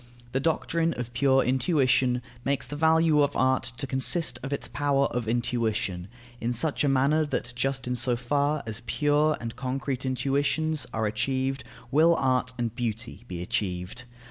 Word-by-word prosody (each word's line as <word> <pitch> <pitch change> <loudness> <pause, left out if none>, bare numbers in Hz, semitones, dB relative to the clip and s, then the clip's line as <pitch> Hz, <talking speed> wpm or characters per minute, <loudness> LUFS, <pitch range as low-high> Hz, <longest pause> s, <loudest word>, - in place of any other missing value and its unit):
The 135 - 0
doctrine 165 +2 0
of 120 -1 -5
pure 135 +1 +3
intuition 130 -2 +2 0.2
makes 140 0 0
the 145 - -7
value 160 0 +4
of 145 0 +1
art 130 -2 +1
to 140 - -3
consist 130 +1 +2
of 135 - -6
its 140 - -2
power 140 -1 +1
of 120 -3 -3
intuition; 110 -6 -1 0.3
in 120 +1 -1
such 150 +6 +1
a 145 - +3
manner 140 +4 +3
that 125 -3 -3
just 135 +1 -1
in 125 - -1
so 120 0 +1
far 145 +4 0
as 110 0 -4
pure 150 +1 +2
and 115 -1 -6
concrete 130 0 -3
intuitions 140 +4 0
are 110 -1 -1
achieved 130 +4 -1 0.3
will 160 +4 +5
art 130 -2 +1
and 120 -2 -2
beauty 115 -1 -4
be 90 -1 -5
achieved. 90 +5 -3
130 Hz, 165 wpm, -27 LUFS, 120-145 Hz, 0.3 s, will